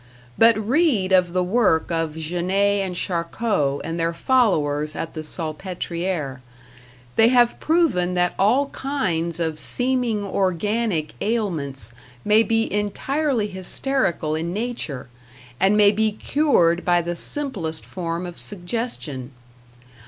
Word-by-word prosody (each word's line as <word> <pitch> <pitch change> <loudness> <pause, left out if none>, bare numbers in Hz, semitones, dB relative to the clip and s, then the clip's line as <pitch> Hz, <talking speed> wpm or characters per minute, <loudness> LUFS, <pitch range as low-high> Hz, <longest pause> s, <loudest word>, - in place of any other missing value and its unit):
But 225 -1 +5
read 225 - +1
of 180 -2 +4
the 180 +1 +1
work 185 -4 +2
of 165 -1 -1
Janet 185 +5 0
and 185 -2 -4
Charcot 170 -4 -1
and 165 +2 -4
their 165 0 0
followers 155 - +1
at 165 - -5
the 155 - -5
Salpetriere; 170 -3 -4 0.8
they 225 - +7
have 240 -1 +3
proven 290 - +1
that 180 0 +1
all 260 +8 +3
kinds 175 - -2
of 160 -2 -2
seeming 245 -5 0
organic 195 -2 -1
ailments 155 - -1 0.3
may 210 +1 +5
be 225 -1 0
entirely 245 +4 0
hysterical 190 - 0
in 165 +2 -2
nature, 210 - -4 0.5
and 195 +2 +4
may 205 -1 +6
be 215 +1 +1
cured 205 - +2
by 175 -1 +2
the 175 +1 -3
simplest 175 - -2
form 170 -1 -4
of 175 -1 -8
suggestion. 175 - -5
185 Hz, 125 wpm, -22 LUFS, 165-225 Hz, 0.8 s, they